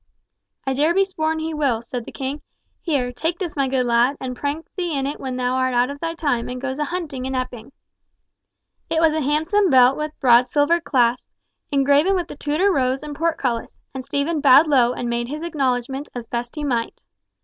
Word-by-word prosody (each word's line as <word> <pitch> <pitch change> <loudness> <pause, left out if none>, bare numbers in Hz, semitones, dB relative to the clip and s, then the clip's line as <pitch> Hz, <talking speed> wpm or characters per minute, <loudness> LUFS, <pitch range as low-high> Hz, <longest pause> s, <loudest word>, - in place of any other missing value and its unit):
"I 270 - 0
dare 305 +6 +2
be 390 0 +4
sworn 320 -4 -2
he 320 0 -3
will," 270 -7 0
said 240 0 -5
the - - -9
king. 275 +2 -5 0.4
"Here, 275 -7 -1
take 325 +6 -2
this, 350 -4 -4
my 275 -2 +1
good 260 -1 0
lad, 240 +4 +2
and 255 -1 -5
prank 290 +5 -3
thee 345 -5 -2
in 270 - -1
it 285 - -4
when 260 -2 -4
thou 250 0 -1
art 255 -1 0
out 245 +3 +2
of 285 - -8
thy 330 +1 -3
time, 285 -8 -1
and 250 0 -5
goest 265 +1 -4
a 295 - 0
hunting 310 -7 -4
in 265 0 -3
Epping!" 255 -1 -5 1.2
It 320 - +1
was 320 -1 +4
a 315 - 0
handsome 320 +8 +2
belt 255 -1 +6
with 305 0 -3
a - - -43
broad 245 -2 +5
silver 295 +5 +2
clasp, 250 -5 +1 0.4
engraven 285 +7 +3
with 350 -2 -2
the - - -7
Tudor 305 +8 +1
rose 260 -1 0
and 295 -1 -6
portcullis; 275 -7 -2 0.2
and 265 -1 -5
Stephen 285 +3 -1
bowed 275 +3 +7
low 260 -6 +3
and 245 - -4
made 235 0 -1
his 300 +5 -5
acknowledgments 270 -3 -2
as 240 -2 -5
best 240 +2 -5
he 300 - -4
might. 240 -5 -2
275 Hz, 215 wpm, -21 LUFS, 250-315 Hz, 1.2 s, bowed